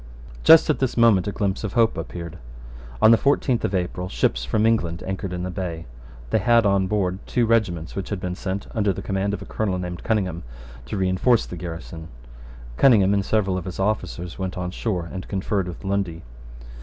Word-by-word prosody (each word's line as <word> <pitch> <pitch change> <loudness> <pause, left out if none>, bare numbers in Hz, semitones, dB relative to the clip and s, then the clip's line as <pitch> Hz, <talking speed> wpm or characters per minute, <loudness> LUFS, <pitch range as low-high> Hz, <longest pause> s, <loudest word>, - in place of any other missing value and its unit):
Just 160 -1 +8
at 155 - +1
this 130 -2 -1
moment 110 -6 +5
a - - -1
glimpse 100 -1 -2
of 105 - -3
hope 115 -1 +3
appeared. 85 0 -6 0.6
On 110 - +8
the 115 - +7
fourteenth 135 -3 +1
of 95 - 0
April 90 0 -2
ships - - 0
from 105 - +1
England 90 -7 +1
anchored 95 0 -4
in 90 0 -4
the 90 - -3
bay. 85 -3 -5 0.5
They - - +3
had 115 +2 +4
on 100 -1 +2
board 95 -2 -1
two 120 -2 +1
regiments 100 -8 0
which 100 - -4
had 100 - -3
been 90 -1 -3
sent, 95 +2 -4
under 105 -3 +1
the 95 - -7
command 100 +1 -1
of 100 - -8
a - - -11
Colonel 100 -4 -2
named 90 -1 -5
Cunningham, 95 -6 -1 0.5
to 85 - -4
reinforce 95 +6 +2
the - - -7
garrison. 80 -1 -7 0.7
Cunningham 100 -7 +5
and 100 -1 +1
several 95 -3 0
of 90 - -9
his 95 0 -6
officers 95 -4 -2
went 95 -1 -3
on 90 0 -3
shore 90 -3 -2
and 95 -1 -6
conferred 95 -1 -1
with 90 - -8
Lundy. 95 -4 -2
95 Hz, 200 wpm, -23 LUFS, 90-105 Hz, 0.7 s, Just